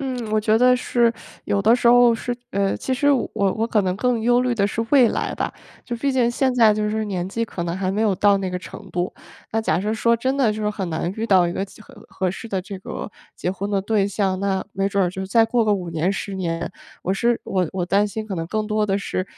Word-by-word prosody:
嗯， 250 -5 -4
我 215 - +3
觉 215 +1 +3
得 250 0 +5
是 240 -2 +2 0.3
有 200 -1 0
的 225 +3 +5
时 245 - -1
候 245 0 +7
是 240 +2 -3
呃， 195 0 0
其 260 - -3
实 285 +3 +3
我 250 -5 0
我 210 +1 +1
可 220 -3 +1
能 185 -1 0
更 245 0 +1
忧 245 +2 +3
虑 250 -1 +1
的 200 -3 +1
是 230 +2 -2
未 260 -5 +6
来 - - -2
吧， - - -3 0.3
就 240 - -4
毕 275 +3 0
竟 250 -3 +2
现 260 +2 +1
在， 225 -4 +5
就 210 0 -1
是 220 0 -1
年 185 -3 -3
纪 230 +3 -2
可 185 -5 -5
能 170 +1 -3
还 190 0 -1
没 210 - -1
有 210 -3 +3
到 200 +1 +4
那 190 -1 -3
个 180 - -3
程 195 +1 -11
度。 175 +1 -2 0.4
那 225 - +1
假 170 -6 +1
设 210 +2 -1
说， 235 +1 +2
真 260 +4 -1
的 240 -6 +3
就 215 - -5
说 210 - 0
很 195 -4 -3
难 170 +3 -2
遇 220 - -2
到 185 -5 +4
一 170 - -2
个 195 - -2
其 200 - -16
合 - - -15
合 190 -1 -2
适 210 +5 -6
的 190 -3 -1
这 195 +2 -8
个 - - -6 0.3
结 180 - -2
婚 200 +2 -4
的 200 -1 +1
对 200 0 +1
象， 190 -2 -1
那 195 -1 0
没 195 +1 0
准 200 -1 +1
儿 - - +1
就 190 +2 -5
再 225 +4 +4
过 230 0 +1
个 210 - +3
5 185 -3 -2
年、 165 +4 0
10 200 0 -4
年， 170 -2 -3 0.3
我 190 - 0
是 235 +3 +1
我 180 -4 0
我 180 -2 -2
担 200 +3 +3
心 215 +2 -5
可 200 - -4
能 165 - -3
更 215 +1 -1
多 215 0 +1
的 195 -1 0
是， 185 -2 -3
210 Hz, 285 characters per minute, -22 LUFS, 190-230 Hz, 0.4 s, 候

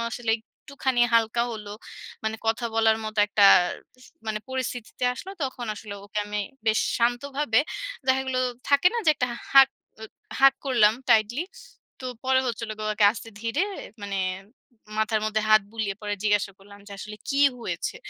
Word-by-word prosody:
আসলে 235 -2 -2
একটুখানি 260 +2 -3
হালকা 230 +1 +3
হল, 210 -2 -7 0.6
মানে 220 0 -1
কথা 225 +2 0
বলার 225 0 +3
মতো 215 0 -5
একটা 205 -1 +3 0.6
স - - -15 0.2
মানে 215 -1 -1
পরিস্থিতিতে 250 -2 -4
আসলো, 380 - -8
তখন 255 -3 -3
আসলে 210 -1 -8
ওকে 210 +1 -5
আমি 210 0 -3 0.3
বেশ 220 - +3 0.2
শান্তভাবে 245 +1 +1 0.5
দেখা 260 0 +3
গেলো 255 -1 0 0.3
থাকে 280 +4 +4
না? - - 0
যে - - +8
একটা 250 -3 -1 0.2
হাগ 270 -1 +9 0.3
অ - - -5 0.4
hug 275 0 +7
করলাম 235 -6 +4 0.2
tightly। 225 +9 +3 0.6
তো 255 - -5 0.2
পরে 260 0 +4
হচ্ছিল 230 -2 -3
গিয়ে 215 0 -2
ওকে 210 - +3
আস্তে 225 0 -9
ধীরে 230 +9 0 0.4
মানে 200 -1 -3 0.8
মাথার 220 0 +1
মধ্যে 215 0 0
হাত 215 -1 +6
বুলিয়ে 215 -3 -2
পরে 205 0 -2
জিজ্ঞাসা 205 -2 +1
করলাম 200 +1 -15
যে, 205 - -13
"আসলে 210 +2 -8
কি 275 - 0 0.2
হয়েছে? - - -4
225 Hz, 160 wpm, -25 LUFS, 215-260 Hz, 0.8 s, হাগ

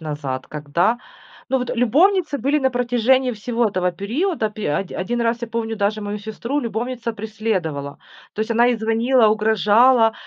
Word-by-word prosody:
назад, 145 -4 -5
когда 150 +10 0 0.5
Ну 265 - +2
вот, 250 -1 -3
любовницы 305 - +2
были 280 +5 +1
на 265 -2 +1
протяжении 245 +1 +2
всего 230 +1 -1
этого 180 -2 -1
периода. 225 - -1
Пе 210 -7 -3
оди 195 - -3
один 240 +6 -2
раз 230 +1 0
я 235 - -3
помню, 225 0 -3
даже 210 +1 0
мою 205 +1 -4
сестру 220 +6 -4
любовница 235 0 -3
преследовала. 200 -10 -3 0.4
То - - -4
есть 220 - -2
она 235 +1 +4
ей 245 -1 +2
звонила, 225 +2 +3
угрожала, 220 +3 +4
225 Hz, 165 wpm, -21 LUFS, 205-245 Hz, 0.5 s, она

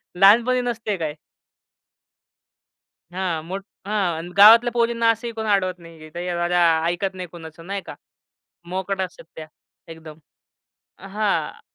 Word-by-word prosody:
लहानपणी 230 +7 +5
नसते 230 -4 -3
काय. 155 -3 -4 2.0
हां, 180 -3 -2
मोठ 190 +3 -6 0.2
हां, 175 -5 -1
गावातल्या 230 +4 +8
पोरींना 235 -1 +1
असंही 230 +1 -5
कोणी 220 -1 -4
अडवत 185 -3 +1
नाही. 165 -2 -13
ते 175 +1 -4
अ, 175 0 -1
रा 175 0 +3 0.2
ऐकत 175 +3 -1
नाही 185 -1 -7
कुणाचं 165 0 -12
नाही 200 0 -3
का, - - -9 0.7
मोकाट 190 +1 -3
असतात 185 -1 -6
त्या 155 -1 -9 0.4
एकदम. 160 -1 -12 0.8
अ, 190 - -12
हां. 205 0 -2
190 Hz, 135 wpm, -22 LUFS, 175-215 Hz, 2.0 s, गावातल्या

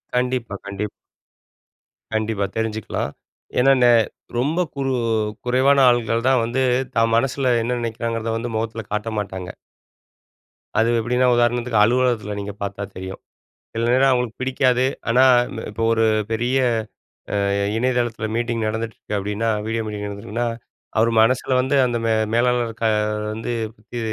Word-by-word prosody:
கண்டிப்பா, 125 -4 -1
கண்டிப் 100 +1 -4 1.2
கண்டிப்பா 110 -2 0
தெரிஞ்சுக்கலாம். 110 -2 -2 0.5
ஏன்னா, 135 +2 +5
நெ 120 - +6 0.5
ரொம்ப 150 +8 0 0.2
குறு 135 -1 -1 0.5
குறைவான 130 +3 +4
ஆள்கள் 115 -1 +1
தான் 130 -3 +4
வந்து 120 +3 -1 0.3
தான் 115 0 +3
மனசுல 130 +1 +1
என்ன 120 +2 -1
நினைக்கிறாங்கிறத 115 0 -2
வந்து 115 0 -4
முகத்தில 115 0 -2
காட்ட 105 +2 -2
மாட்டாங்க. 95 -3 -5 1.3
அது 115 - +3
எப்படின்னா 125 +3 +1
உதாரணத்துக்கு 120 -1 +2
அலுவலகத்தில 120 -3 +1
நீங்க 100 0 -5
பார்த்தா 100 0 -4
தெரியும். 95 +1 -7 0.5
சில 115 +1 0
நேரம் 135 +1 +4
அவங்களுக்கு 125 -1 -1
பிடிக்காது. 130 -1 +2 0.3
ஆனா, 125 +2 +5 0.3
இந்த 115 - -6
இப்போ 115 +2 -2
ஒரு 115 0 +2 0.3
பெரிய 120 +4 +1 0.9
அ - - +1 0.3
இணையதளத்தில 120 -2 0
மீட்டிங் 115 -2 -1
நடந்துட்டு 110 +1 -3
இருக்கு 105 - -4
அப்டின்னா, 105 +3 -1 0.2
வீடியோ 115 0 -1
மீட்டிங் 105 -1 -4
நடந்திருக்குன்னா. 105 +4 -3 0.5
அவர் 115 +1 +4
மனசுல 130 +2 +2
வந்து 130 +2 +1
அந்த 120 -1 -1
மே 115 - +2 0.2
மேலாளர் 120 -1 +2
க - - -1 0.5
வந்து 115 +2 -4 0.2
பத்தி 115 +3 -9
115 Hz, 135 wpm, -21 LUFS, 110-125 Hz, 1.3 s, நெ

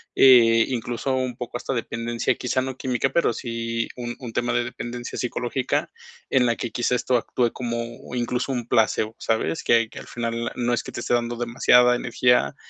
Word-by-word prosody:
eh, 115 -3 +7
incluso, 120 +1 -2
un 130 -2 -2
poco 120 0 -5
hasta 135 - -4
dependencia, 115 0 -1
quizá 130 +1 -1
no 130 0 -4
química, 130 0 -1
pero 150 -7 +2
sí 115 -1 -3
un 120 -1 -4
un 120 -4 -8
tema 120 0 0
de 120 - +2
dependencia 120 0 -6
psicológica. 125 +1 -1 0.4
En 125 -2 +4
la 115 - +2
que, 120 - -5
quizá, 120 +1 0
esto 125 0 +1
actúe 120 0 0
como, 120 0 -5
incluso, 125 +2 -1
un 120 -3 -3
placebo, 110 0 +1
¿sabes? 115 +8 -1
Que 115 -1 +3
que - - -9
al - - -11
final 115 0 -3
no 120 0 0
es 120 - +1
que - - -8
te - - -4
esté - - -1
dando 120 0 0
demasiada 125 +1 +4
energía, 120 - +2
120 Hz, 190 wpm, -24 LUFS, 115-125 Hz, 0.4 s, eh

